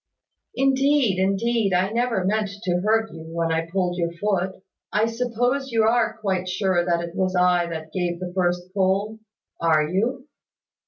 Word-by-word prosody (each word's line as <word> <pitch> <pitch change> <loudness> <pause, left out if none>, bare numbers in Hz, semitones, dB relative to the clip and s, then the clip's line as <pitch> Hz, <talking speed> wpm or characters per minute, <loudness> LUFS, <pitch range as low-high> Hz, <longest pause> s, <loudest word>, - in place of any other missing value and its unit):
"Indeed, 270 -5 +2
indeed, 195 +2 +1
I 185 +3 +1
never 230 -5 0
meant 210 +1 +1
to 180 -1 0
hurt 220 +1 +1
you 165 - -9
when 165 +1 -2
I 165 0 0
pulled 180 0 -1
your 170 0 0
foot 190 0 -1 0.3
I 210 +1 +2
suppose 245 +3 -1
you 225 -1 +3
are 225 0 +2
quite 190 -4 -2
sure 185 -1 +1
that 170 -1 0
it 170 0 -6
was 185 -1 0
I 180 -1 +3
that 160 -1 -7
gave 175 -2 -2
the 180 -1 -6
first 180 0 -1
pull? 200 +3 0 0.4
Are 155 -2 +3
you?" 235 - -1
190 Hz, 165 wpm, -23 LUFS, 175-225 Hz, 0.4 s, you